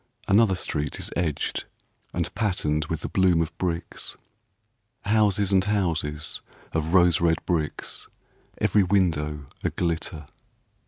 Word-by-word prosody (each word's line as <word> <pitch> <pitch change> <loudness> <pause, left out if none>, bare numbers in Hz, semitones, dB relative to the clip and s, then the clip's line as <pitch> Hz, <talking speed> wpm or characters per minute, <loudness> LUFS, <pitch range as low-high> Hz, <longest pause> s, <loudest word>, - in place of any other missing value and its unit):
Another 100 -1 +5
street 75 -5 -2
is - - -4
edged 80 -4 -1 0.5
and - - -2
patterned 75 -8 0
With 80 0 -3
the - - -3
bloom 90 -3 +3
of 80 0 -1
bricks, 85 -2 -3 0.8
Houses 105 -2 +2
and 95 -1 +4
houses 85 -7 -1 0.3
of 80 +2 0
rose 90 -3 +5
red 80 -1 +4
bricks, 80 -4 -2 0.5
Every 105 - +4
window 80 -7 +1 0.2
a - - +2
glitter. 80 -2 -2
85 Hz, 120 wpm, -26 LUFS, 80-95 Hz, 0.8 s, Another